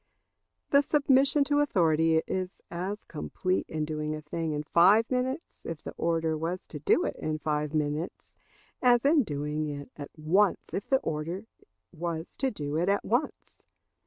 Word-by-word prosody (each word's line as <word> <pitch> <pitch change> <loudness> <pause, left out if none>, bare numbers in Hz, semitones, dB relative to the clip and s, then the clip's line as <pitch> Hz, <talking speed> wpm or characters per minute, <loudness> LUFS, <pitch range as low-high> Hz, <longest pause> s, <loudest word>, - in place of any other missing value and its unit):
The 280 - +7
submission 280 0 +3
to 290 +1 +1
authority 165 - +3
is 185 0 -3
as 190 +5 -4
complete 185 +4 -2
in 155 -1 -2
doing 155 0 -3
a 155 - -7
thing 160 +1 -3
in 150 0 -2
five 195 - +5
minutes 260 +5 -2
if 165 -2 -6
the - - -5
order 165 -1 0
was 165 +4 -3
to 150 - -6
do 145 - +3
it - - -2
in 155 0 -2
five 150 0 -2
minutes, 150 +2 -3 0.5
as 245 0 +4
in 295 +1 +5
doing 150 - -2
it 145 -1 -6
at 145 -1 -7
once 185 +6 +2
if 195 - -4
the 270 - +5
order 165 +6 -3 0.5
was 165 0 -4
to 270 - +1
do 150 - -4
it 175 +4 +1
at 200 0 +1
once. 250 +7 -2
165 Hz, 165 wpm, -28 LUFS, 155-220 Hz, 0.5 s, The